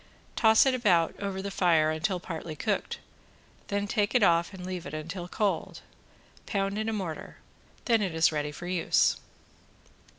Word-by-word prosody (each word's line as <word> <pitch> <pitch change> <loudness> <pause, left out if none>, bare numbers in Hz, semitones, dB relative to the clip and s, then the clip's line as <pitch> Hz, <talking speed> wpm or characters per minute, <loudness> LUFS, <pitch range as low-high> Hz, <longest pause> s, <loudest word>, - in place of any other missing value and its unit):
Toss 220 +1 +5
it 265 - +3
about 185 -10 +2
over 195 -1 -4
the 200 - -4
fire 165 -5 +3
until 175 +4 -1
partly 165 -2 -6
cooked. 205 +5 -2 0.7
Then 200 0 -1
take 210 +2 0
it 245 - +5
off 170 -1 +3
and 185 -2 -9
leave 180 -4 -5
it 145 - -6
until 170 +3 -6
cold. 205 +2 -2 0.7
Pound 195 0 -1
in 220 +1 -1
a - - -2
mortar, 185 -7 -5 0.5
then 230 -3 +3
it 185 -5 -2
is 160 0 +4
ready 150 -1 -2
to 160 +4 -9
use. 180 -1 +2
185 Hz, 165 wpm, -28 LUFS, 165-205 Hz, 0.7 s, Toss